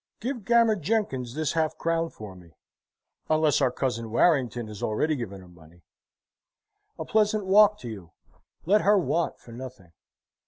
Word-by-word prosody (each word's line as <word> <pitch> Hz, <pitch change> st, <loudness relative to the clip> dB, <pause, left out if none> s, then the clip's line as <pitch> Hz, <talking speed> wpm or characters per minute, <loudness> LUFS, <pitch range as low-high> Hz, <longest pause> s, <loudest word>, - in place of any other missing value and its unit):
Give 245 Hz, -1 st, -4 dB
Gammer 230 Hz, 0 st, +4 dB
Jenkins 150 Hz, -, -2 dB
this 155 Hz, -1 st, -1 dB
half 160 Hz, -1 st, -1 dB
crown 165 Hz, 0 st, -1 dB
for 105 Hz, -8 st, -11 dB
me 85 Hz, -2 st, -17 dB, 0.7 s
unless 155 Hz, -2 st, +2 dB
our 125 Hz, -, +3 dB
cousin, 120 Hz, -3 st, -3 dB
Warrington, 120 Hz, -2 st, +2 dB
has 105 Hz, -2 st, -10 dB
already 150 Hz, +9 st, 0 dB
given 100 Hz, -7 st, -6 dB
her 90 Hz, -, -15 dB
money. 85 Hz, 0 st, -19 dB, 1.1 s
A -, -, -5 dB
pleasant 215 Hz, -1 st, +1 dB
walk 210 Hz, +2 st, +5 dB
to 120 Hz, -, -7 dB
you. 95 Hz, -7 st, -9 dB, 0.5 s
Let 205 Hz, +5 st, +4 dB
her 205 Hz, +1 st, +4 dB
want 170 Hz, -2 st, -1 dB
for 120 Hz, -, -15 dB
nothing." 120 Hz, -7 st, -10 dB
145 Hz, 155 wpm, -26 LUFS, -, 1.1 s, walk